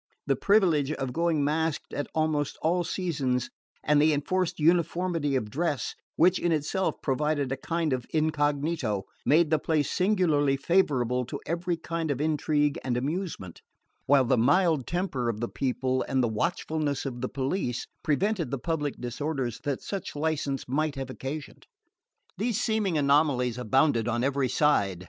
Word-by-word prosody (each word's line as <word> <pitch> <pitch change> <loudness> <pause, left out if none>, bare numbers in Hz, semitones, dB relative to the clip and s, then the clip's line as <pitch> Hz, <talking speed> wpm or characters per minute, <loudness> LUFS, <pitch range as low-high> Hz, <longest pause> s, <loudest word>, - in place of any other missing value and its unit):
The - - +2
privilege 170 -9 +3
of 135 -4 -4
going 165 -3 +1
masked 155 +1 -1
at 145 - -2
almost 155 -2 0
all 175 +3 +2
seasons 145 -9 -1 0.3
and 150 -1 +4
the 155 +1 +4
enforced 175 +4 -1
uniformity 165 -2 +1
of 110 -5 -2
dress, 155 -1 -1 0.2
which 180 +3 +4
in 175 - 0
itself 160 +5 0
provided 145 0 0
a - - +1
kind 165 +2 -1
of 125 -2 -3
incognito, 145 - 0 0.2
made 160 +1 +4
the 155 - +3
place 150 -3 0
singularly 165 -8 +2
favourable 135 -7 +1
to - - -6
every 170 +2 -1
kind 165 -1 -3
of 140 -2 -1
intrigue 150 -1 +1
and 125 -2 -1
amusement; 145 - -4 0.5
while 135 -1 +5
the 125 0 +2
mild 155 +2 +3
temper 170 -9 -1
of 110 -2 -3
the 120 - -1
people 130 0 -1
and 130 -1 +1
the - - +3
watchfulness 150 +4 -1
of 120 -3 -5
the 130 - -2
police 135 -2 -2 0.2
prevented 180 - 0
the 140 - -2
public 150 0 -2
disorders 125 0 -3
that 140 -3 -2
such 195 -6 -5
license 145 -3 -2
might 150 +3 0
have 135 -1 -5
occasioned. 140 +3 -7 0.7
These 220 0 0
seeming 215 -8 0
anomalies 140 -4 +2
abounded 125 0 +2
on 120 0 0
every 135 -1 +1
side. 125 - +2
145 Hz, 155 wpm, -27 LUFS, 130-165 Hz, 0.7 s, while